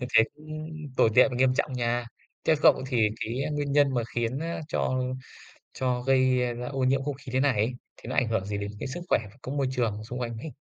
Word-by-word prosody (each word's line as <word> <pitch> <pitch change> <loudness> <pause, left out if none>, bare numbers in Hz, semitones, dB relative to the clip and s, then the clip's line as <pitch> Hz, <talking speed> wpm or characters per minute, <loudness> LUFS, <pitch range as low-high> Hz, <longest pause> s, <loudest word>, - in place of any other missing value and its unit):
Như 125 - -3
thế 110 0 +8
cũng 155 +1 -7 0.3
tồi 110 - +5
tệ 130 - +7
và 125 - -4
nghiêm 130 0 +3
trọng 140 0 0
nha. 120 -1 0 0.4
Theo 160 - +4
cậu - - +6
thì 120 -5 +3
cái, 120 +5 -2
a, - - -2
nguyên 145 -1 -1
nhân 145 -2 +4
mà 120 - +1
khiến, 120 +2 0
a, 165 +1 -3
cho 130 -5 0 0.7
cho 125 -1 -1
gây 130 -1 +4 0.2
ra 125 +1 -5
ô 135 -1 -4
nhiễm 135 +1 +2
không 145 0 -2
khí 135 -2 -10
thế 130 - +1
này 140 -1 +3
ấy, 110 +3 +1 0.2
thì - - -12
nó - - -3
ảnh 125 - +3
hưởng 110 -4 0
gì 100 0 -3
đến 100 0 -4
cái - - -3
sức 155 +7 -5
khỏe - - +4 0.2
có 130 - -6
môi 140 -2 0
trường 115 -5 -1
xung 125 +3 -6
quanh 115 -2 -3
hình? 150 +7 -6
130 Hz, 255 wpm, -27 LUFS, 120-140 Hz, 0.7 s, thế